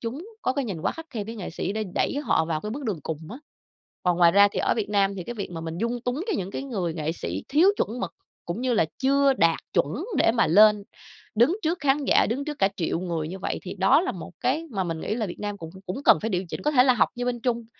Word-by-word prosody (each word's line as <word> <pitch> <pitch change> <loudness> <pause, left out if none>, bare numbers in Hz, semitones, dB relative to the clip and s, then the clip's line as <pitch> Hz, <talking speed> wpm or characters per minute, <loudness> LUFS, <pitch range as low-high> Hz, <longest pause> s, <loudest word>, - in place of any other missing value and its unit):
chúng 260 - -5 0.2
có - - +1
cái 275 0 -1
nhìn 185 -8 -4
quá - - 0
khắt 325 0 -9
khe 215 -4 -4
với 225 +2 -7
nghệ 195 - -6
sĩ 180 - -3
đã 220 +1 -2
đẩy - - 0
họ 160 - +3
vào 160 -1 -2
cái 210 - -5
bước 275 +5 -5
đường 205 -9 -2
cùng 160 0 -4
á. 240 - -6 0.7
Còn 180 -1 +1
ngoài 170 -1 +6
ra 200 +1 +7
thì - - -2
ở - - +2
Việt 215 -3 -2
Nam 200 -1 +2
thì 180 - -5
cái 240 - -6
việc 200 -5 -5
mà 165 - -5
mình 165 +1 -5
dung 235 +3 -1
túng 245 +4 -2
cái 425 -7 0
những 190 0 -4
cái - - -4
người 190 -11 -3
nghệ 160 -1 -2
sĩ 95 - -5
thiếu 320 +7 +5
chuẩn 235 +4 -1
mực, 175 -3 -3 0.3
cũng 170 +6 -3
như 255 -2 +1
là 210 - +3
chưa 275 +1 +3
đạt 165 -8 +3 0.2
chuẩn 155 - 0
để - - +4
mà 230 -1 +3
lên 210 +4 +6 0.5
đứng 240 - +4
trước 335 +3 0
khán 285 0 +2
giả, - - +4
đứng 260 +6 -2
trước 295 -1 -5
cả 195 - +4
triệu 170 -2 -1
người 170 -4 -3
như 190 +3 -6
vậy - - -3
thì 185 - -6
đó 195 - +4
là 375 - -2
một 175 -3 -9
cái 285 +7 0
mà 195 -5 -1
mình 165 -2 -3
nghĩ 215 - -2
là 225 -2 -1
Việt 175 - -8
Nam 205 -1 -3
cũng 165 -3 -8 0.2
cũng 185 +10 -4
cần - - +7
phải 225 - -1
điều 185 -1 -1
chỉnh. - - -4
Có 300 - +3
thể 255 -4 +5
là 255 -1 +5
học - - +3
như 245 - -3
bên 245 -1 -2
Trung, 235 -1 -1
215 Hz, 290 wpm, -25 LUFS, 180-255 Hz, 0.7 s, ra